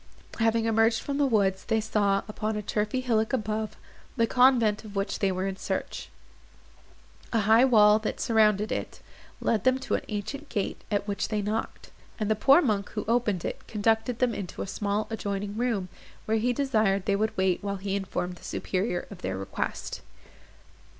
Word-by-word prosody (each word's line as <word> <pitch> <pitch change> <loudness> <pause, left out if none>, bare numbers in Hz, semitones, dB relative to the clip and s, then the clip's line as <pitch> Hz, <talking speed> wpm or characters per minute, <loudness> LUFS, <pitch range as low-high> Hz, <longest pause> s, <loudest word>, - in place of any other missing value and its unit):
Having 225 0 +2
emerged 225 0 +3
from 280 0 -2
the 285 - +4
woods, 195 -5 +1
they 225 -1 +1
saw, 205 -2 +1
upon 215 0 -3
a 210 - -3
turfy 210 +5 -1
hillock 225 -3 0
above, 215 -2 -2 0.4
the 230 - +4
convent 235 -4 +4
of 210 -2 -11
which 195 0 -2
they 195 -1 +2
were 185 +1 -2
in 195 -1 -3
search. - - -4 1.2
A 230 - +2
high 220 +5 +5
wall, 210 -4 +6
that 215 - -4
surrounded 215 -3 +3
it, - - -4 0.4
led 220 -3 0
them 255 0 +4
to 265 - -4
an - - +1
ancient 275 +8 -5
gate, 205 -4 -2
at 205 -1 -1
which 200 -1 -1
they 210 -2 -1
knocked; 215 +2 -4 0.3
and 215 -1 0
the - - +3
poor 275 +10 +5
monk, 210 -6 0
who 210 - -3
opened 225 -6 +1
it, - - -5
conducted 225 +2 +1
them 245 -1 +1
into 190 -3 -5
a - - -5
small 205 +2 -1
adjoining 200 -2 -3
room, 225 -5 -1 0.4
where 220 +1 +1
he 240 +3 +1
desired 220 -7 +1
they 200 - +2
would 215 +2 -1
wait 190 0 +1
while 200 -1 -2
he 195 +1 -3
informed 180 -2 -3
the - - -18
superior 185 -1 -2
of 195 - -9
their 95 0 -3
request. 95 - -4
215 Hz, 185 wpm, -27 LUFS, 200-225 Hz, 1.2 s, wall